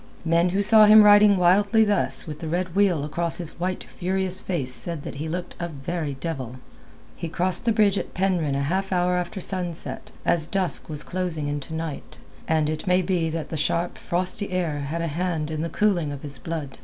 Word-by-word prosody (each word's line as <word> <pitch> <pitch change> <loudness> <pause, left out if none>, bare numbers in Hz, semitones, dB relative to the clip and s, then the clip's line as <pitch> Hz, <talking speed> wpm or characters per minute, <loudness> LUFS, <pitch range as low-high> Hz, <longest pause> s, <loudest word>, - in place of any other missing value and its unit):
Men 170 +2 +3
who 195 +3 0
saw 215 +1 +7
him 215 0 +8
riding 205 -1 +7
wildly 200 +5 +4
thus 205 -1 +1
with 150 -3 -7
the 160 - -5
red 180 +2 -2
wheal 190 -7 +3
across 165 +2 -2
his 170 -1 -7
white 185 +1 -2
furious 190 0 -2
face 140 -9 -1
said 165 +2 -3
that - - -7
he 155 +2 -4
looked 180 +2 -4
a 170 - -2
very 150 0 -4
devil. 135 -4 -5 0.6
He 170 - -5
crossed 180 +5 0
the 235 - +3
bridge 210 -3 +3
at - - -7
Penryn 175 -6 0
a 140 - 0
half 190 +7 -1
hour 180 0 +2
after 180 +3 -3
sunset, 175 -3 -3 0.2
as 160 -3 +2
dusk 190 -4 -1
was 150 -1 -3
closing 175 -5 -2
into 145 +1 -4
night, 160 -2 -6 0.3
and 160 -1 +2
it 155 +2 -4
may 180 0 +3
be 170 -3 0
that 160 -1 -4
the 160 - -4
sharp, 170 +3 0
frosty 185 +3 -1
air 170 -5 -1
had 150 +4 -3
a - - -1
hand 160 -1 -2
in 155 -1 -3
the 165 - -2
cooling 175 -4 +1
of 140 -1 -8
his 140 -2 -4
blood. 155 -5 -6
170 Hz, 205 wpm, -24 LUFS, 155-185 Hz, 0.6 s, him